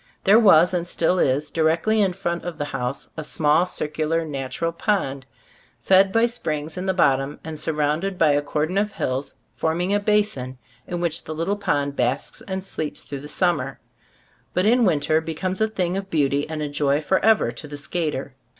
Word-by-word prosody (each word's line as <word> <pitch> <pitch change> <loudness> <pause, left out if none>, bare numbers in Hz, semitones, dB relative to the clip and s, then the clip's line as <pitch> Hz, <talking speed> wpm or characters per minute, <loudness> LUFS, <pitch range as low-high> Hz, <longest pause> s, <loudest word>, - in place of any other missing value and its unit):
There 205 +4 +6
was, 180 -5 +6
and 175 -1 -1
still 180 +1 +1
is, 145 +2 +1
directly 165 +7 +2
in 190 -3 +2
front 175 -2 -3
of 175 -3 -5
the 145 - -2
house, 135 -1 -4
a 155 - -5
small, 155 +3 +2
circular, 160 0 -1
natural 140 +2 -3
pond, 140 -8 -1 0.5
fed 190 0 +4
by 225 +3 +4
springs 155 -10 -3
in 185 +1 -4
the 190 - +2
bottom 135 -4 +2
and 160 -1 -7
surrounded 155 +5 -1
by 160 -4 +4
a 145 0 +2
cordon 155 +6 -1
of 210 0 -1
hills 130 +2 -3 0.2
forming 175 +4 0
a 205 - +3
basin 205 -12 0 0.3
in 175 -1 -3
which 170 -1 -1
the 155 - -5
little 170 +6 -1
pond 145 -8 -1
basks 125 +2 -1
and 190 -1 -3
sleeps 155 -5 -5
through 140 - -6
the 145 - -8
summer, 150 -5 0 0.8
but 180 - +2
in 240 +2 +4
winter 155 -2 +2
becomes 180 +5 -3
a 220 - +4
thing 185 -4 -2
of 195 0 -4
beauty 145 -3 +1
and 155 -1 -3
a - - -2
joy 145 0 +1
forever 190 - +2
to 120 +5 -8
the 145 0 -7
skater. 150 -3 -3
160 Hz, 185 wpm, -23 LUFS, 145-190 Hz, 0.8 s, There